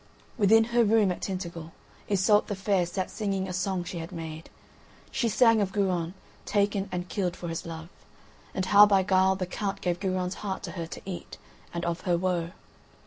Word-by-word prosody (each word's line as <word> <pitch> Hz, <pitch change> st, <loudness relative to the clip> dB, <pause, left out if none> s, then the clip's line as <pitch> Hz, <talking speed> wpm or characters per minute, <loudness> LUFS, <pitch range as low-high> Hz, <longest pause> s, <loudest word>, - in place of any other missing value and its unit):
Within 225 Hz, 0 st, +5 dB
her 240 Hz, 0 st, +5 dB
room 215 Hz, -3 st, +4 dB
at 180 Hz, -, -5 dB
Tintagel 170 Hz, -4 st, -5 dB, 0.4 s
Iseult 205 Hz, +1 st, +3 dB
the 205 Hz, -, -2 dB
Fair 190 Hz, -2 st, +1 dB
sat 185 Hz, +1 st, -3 dB
singing 195 Hz, -3 st, -2 dB
a 185 Hz, -, -5 dB
song 185 Hz, 0 st, -1 dB
she 175 Hz, 0 st, -6 dB
had 165 Hz, +1 st, -7 dB
made. 160 Hz, -1 st, -7 dB, 0.6 s
She 240 Hz, -3 st, 0 dB
sang 230 Hz, 0 st, +5 dB
of 195 Hz, -2 st, 0 dB
Guron 185 Hz, -3 st, 0 dB, 0.3 s
taken 200 Hz, -1 st, 0 dB
and 180 Hz, 0 st, -3 dB
killed 180 Hz, -4 st, -2 dB
for 170 Hz, -, -6 dB
his 165 Hz, 0 st, -4 dB
love, 160 Hz, 0 st, -7 dB, 0.7 s
and 190 Hz, -, 0 dB
how 205 Hz, +2 st, +8 dB
by 195 Hz, -2 st, +4 dB
guile 190 Hz, 0 st, +3 dB
the 185 Hz, -1 st, -2 dB
Count 195 Hz, +2 st, -3 dB
gave 175 Hz, -2 st, -1 dB
Guron's 185 Hz, -1 st, -1 dB
heart 195 Hz, -2 st, -4 dB
to -, -, -5 dB
her 165 Hz, -2 st, -5 dB
to -, -, -8 dB
eat, 185 Hz, -2 st, -7 dB, 0.3 s
and 170 Hz, 0 st, -3 dB
of 170 Hz, 0 st, -2 dB
her 175 Hz, -2 st, +1 dB
woe. 175 Hz, -2 st, -1 dB
190 Hz, 195 wpm, -28 LUFS, 175-200 Hz, 0.7 s, how